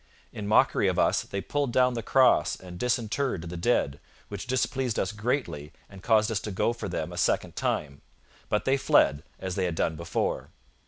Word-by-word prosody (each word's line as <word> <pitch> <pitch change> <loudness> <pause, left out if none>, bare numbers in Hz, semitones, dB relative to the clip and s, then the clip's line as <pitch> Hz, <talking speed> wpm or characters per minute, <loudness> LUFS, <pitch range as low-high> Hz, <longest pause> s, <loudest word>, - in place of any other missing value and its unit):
In 105 -1 -5
mockery 105 - +4
of - - 0
us - - +3
they 100 - -5
pulled 145 +1 -1
down 125 +1 +3
the 115 - -3
cross 130 +3 +3
and 90 -1 -11
disinterred 125 -4 -1
the 85 +1 -6
dead, 85 - 0 0.3
which 100 +4 -6
displeased 130 -1 0
us 95 - 0
greatly 105 - -3
and 95 -2 -13
caused 110 +1 +3
us 110 - 0
to 105 - -6
go 105 +5 +1
for 120 - -6
them 80 +2 -3
a - - -8
second - - 0
time; 70 -2 -2 0.5
but 105 - 0
they 135 +1 +3
fled, 75 - +3 0.2
as 95 -1 -4
they 95 0 0
had 85 -2 -2
done 80 - 0
before. 85 +1 -2
105 Hz, 195 wpm, -27 LUFS, 90-125 Hz, 0.5 s, mockery